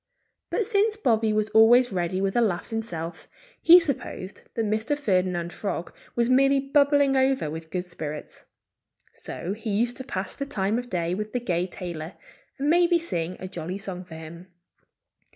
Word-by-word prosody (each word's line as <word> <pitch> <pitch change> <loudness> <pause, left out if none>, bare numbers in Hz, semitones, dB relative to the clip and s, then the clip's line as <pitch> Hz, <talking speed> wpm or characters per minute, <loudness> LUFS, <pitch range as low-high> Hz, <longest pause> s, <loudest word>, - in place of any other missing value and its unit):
But 450 - 0
since 425 +2 +2
Bobby 225 - +2
was 215 0 0
always 235 +3 +6
ready 185 0 -1
with 195 0 0
a 240 - +4
laugh 190 -6 0
himself, 175 -7 -4 0.3
he 345 +2 +9
supposed 270 - -4
that 225 - 0
Mr. 220 +7 0
Ferdinand 185 -8 0
Frog 195 -4 -4 0.2
was 235 -1 +2
merely 275 +2 +4
bubbling 280 0 +3
over 265 - +2
with 160 0 -7
good 180 +1 -3
spirits. 155 -4 -7 0.7
So 185 - -5
he 220 +2 -6
used 235 +4 0
to 260 - -6
pass 195 -7 -4
the 280 - -5
time 205 0 0
of 245 0 -8
day 170 -3 -1
with 210 +3 -4
the 250 - 0
gay 180 -6 -1
tailor 175 -2 -7 0.4
and 275 +1 -1
maybe 345 +2 +4
sing 180 - -3
a 185 - -6
jolly 180 0 -5
song 190 -2 -6
for 170 -3 -11
him. 165 +3 -10
215 Hz, 170 wpm, -26 LUFS, 180-260 Hz, 0.7 s, he